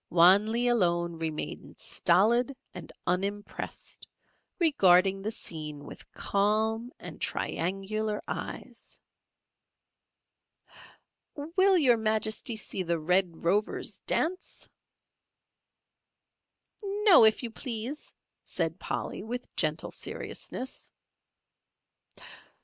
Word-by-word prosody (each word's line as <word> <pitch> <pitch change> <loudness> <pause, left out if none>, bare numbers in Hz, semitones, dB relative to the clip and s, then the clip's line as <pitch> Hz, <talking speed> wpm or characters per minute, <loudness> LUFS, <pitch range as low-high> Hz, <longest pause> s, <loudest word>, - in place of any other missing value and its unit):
Wan 185 +5 +6
Lee 240 +2 +1
alone 170 -7 +1
remained 160 -2 -4
stolid 235 +9 +2 0.2
and - - -9
unimpressed, 200 +3 -3 0.5
regarding 195 - +4
the 210 - -2
scene 155 -8 -4
with - - -12
calm 220 +4 0
and - - -10
triangular 205 +4 -2
eyes. - - -7 2.4
"Will 365 +6 +2
Your 255 -8 +5
Majesty 220 +2 0
see 205 -2 -2
the 170 -1 0
Red 180 +1 +1
Rover's 200 +5 0
dance?" 365 +3 -1 2.1
"No, 405 - +5
if 220 +3 +5
you 235 - -4
please," 245 +4 -4 0.3
said 165 0 -2
Polly, - - -4
with 245 +4 -6
gentle - - -1
seriousness. 260 +1 -5
215 Hz, 85 wpm, -29 LUFS, 180-240 Hz, 2.4 s, Wan